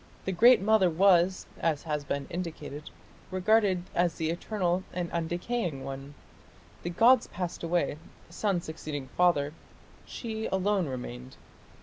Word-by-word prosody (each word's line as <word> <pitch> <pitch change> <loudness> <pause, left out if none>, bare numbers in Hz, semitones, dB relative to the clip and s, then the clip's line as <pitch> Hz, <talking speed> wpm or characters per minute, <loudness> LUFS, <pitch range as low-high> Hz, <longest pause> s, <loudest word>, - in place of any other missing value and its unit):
The 190 - 0
Great 235 +7 +7
Mother 210 -2 +4
was, 185 +1 +4
as 160 -3 0
has 150 -2 -2
been 140 0 -3
indicated, 155 -4 -6 0.4
regarded 185 -1 +2
as 175 -1 +1
the 160 0 -1
eternal 180 0 -1
and 175 -1 -3
undecaying 175 - -2
one; 135 +1 -7 0.7
the 175 - -3
gods 230 +7 +5
passed 180 -2 -5
away, 165 -3 0 0.3
son 180 +1 -1
succeeding 150 -4 -6
father; 155 -5 +3 0.5
she 220 -2 -4
alone 190 -2 +1
remained. 125 0 -7
175 Hz, 125 wpm, -29 LUFS, 150-190 Hz, 0.7 s, Great